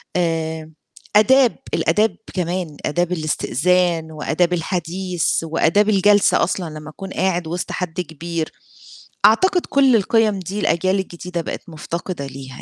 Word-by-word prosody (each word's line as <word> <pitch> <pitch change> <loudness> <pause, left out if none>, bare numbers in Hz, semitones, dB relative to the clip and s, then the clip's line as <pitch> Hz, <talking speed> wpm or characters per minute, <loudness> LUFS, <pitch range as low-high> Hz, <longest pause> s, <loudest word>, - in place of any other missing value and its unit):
آآ 160 -2 -1 0.4
أداب، 245 +4 +5 0.2
الآداب 215 -3 +2 0.2
كمان، 175 -4 -3
آداب 175 +3 0
الاستئذان 165 +1 0
وآداب 160 +3 0
الحديث 175 0 -1
وآداب 165 +6 +2
الجلسة 205 0 +4
أصلًا 160 -5 -3
لمّا 155 0 -10
تكون 195 +4 -8
قاعد 180 -3 0
وِسط 175 +2 -4
حد 180 0 -3
كبير. 165 0 -5 0.7
أعتقد 360 - +4
كل 270 -3 +4
القِيَم 215 -1 +2
دي 190 +3 -5
الأجيال 185 +1 +1
الجديدة 180 -1 -5
بقت 165 - -7
مُفتقدة 165 0 -5
ليها 130 -1 -10
175 Hz, 125 wpm, -20 LUFS, 160-195 Hz, 0.7 s, أداب